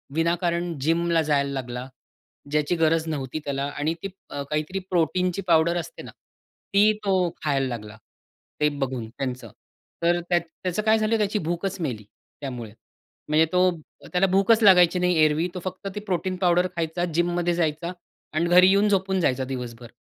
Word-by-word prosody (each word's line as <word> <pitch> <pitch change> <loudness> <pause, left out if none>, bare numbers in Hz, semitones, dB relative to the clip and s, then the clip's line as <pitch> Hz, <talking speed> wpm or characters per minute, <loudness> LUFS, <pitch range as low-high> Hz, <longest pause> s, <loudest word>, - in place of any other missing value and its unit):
विनाकारण 170 0 0
जिमला 165 +2 +2
जायला 140 -2 +1
लागला. 125 -1 -5 0.6
ज्याची 150 +3 +1
गरज 165 0 +2
नव्हती 145 -2 -3
त्याला 140 -1 -2
आणि 155 +3 0
ती 195 - -3 0.2
अ, 140 -1 -4
काहीतरी 155 +5 -2
प्रोटीनची 180 +2 +1
पावडर 170 +1 +4
असते 170 -1 -7
ना, - - -10 0.6
ती 210 +2 +6
तो 185 -3 +2
खायला 135 -3 +1
लागला 105 -3 -7 0.6
ते 150 - +4
बघून 130 -5 -3
त्यांचं. 130 +2 -5 0.5
तर 175 +1 +3
त्यात 175 -1 +3 0.2
त्याचं 185 +3 -1
काय 220 +1 +4
झालं, 220 +1 +1
त्याची 210 0 0
भूकच 175 +3 -3
मेली 125 -10 -3 0.4
त्यामुळे, 125 -6 -6 0.6
म्हणजे 155 +1 +4
तो 180 0 +4 0.4
त्याला 180 +2 +3
भूकच 195 +4 +3
लागायची 180 -3 +6
नाही. 180 0 +2
एरवी 155 +3 +1
तो 180 - -4
फक्त 185 +1 -5
ती 210 - -4
प्रोटीन 185 -2 -2
पावडर 180 -1 +3
खायचा, 165 +1 -1
जिममध्ये 175 +1 +1
जायचा 170 +1 -1 0.4
आणि 165 +2 +1
घरी 180 +1 +7
येऊन 200 +2 +4
झोपून 190 -1 +1
जायचा 130 -4 +1
दिवसभर. 125 -2 -7
170 Hz, 160 wpm, -24 LUFS, 145-185 Hz, 0.6 s, घरी